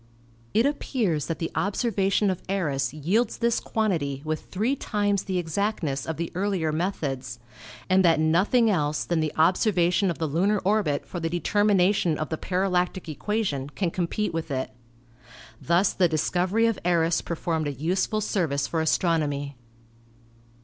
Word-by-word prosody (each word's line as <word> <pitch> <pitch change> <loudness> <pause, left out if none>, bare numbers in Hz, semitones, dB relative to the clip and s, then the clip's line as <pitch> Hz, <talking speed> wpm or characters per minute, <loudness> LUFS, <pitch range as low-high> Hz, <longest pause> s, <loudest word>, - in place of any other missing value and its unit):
It 225 +3 +4
appears 225 - -1
that 165 - -2
the 165 - -3
observation 200 -1 +1
of 185 - -5
Eros 145 -10 0
yields 175 - 0
this 235 0 +1
quantity 160 -11 -1
with 155 0 -4
three 220 +8 0
times 205 -5 -1
the 190 -1 -1
exactness 165 -5 -2
of 160 - -3
the 170 0 -3
earlier 185 -4 0
methods, 140 -8 -3 0.5
and 190 +1 +4
that 165 -3 +4
nothing 185 +10 +3
else 150 -7 0
than 170 -2 0
the 155 -1 0
ob 165 +4 +4
servation 180 -2 +2
of 170 - -2
the 165 - -1
lunar 180 +8 +1
orbit 200 -8 +1
for 175 - -6
the 165 0 -2
determination 190 -2 +2
of 155 - -3
the 160 - -2
parallactic 180 -1 -1
equation 155 -4 -2
can 170 +3 -2
compete 185 +4 -2
with 165 0 -3
it. 130 -2 -2 0.9
Thus 175 +4 +2
the 180 - +3
dis 155 -1 0
covery 190 +6 +2
of 225 -3 -1
Eros 170 -1 +2
performed 165 -2 -2
a - - -1
useful 185 +9 -1
service 160 -9 0
for 160 +3 -1
astronomy. 150 -4 0
175 Hz, 155 wpm, -25 LUFS, 155-200 Hz, 0.9 s, It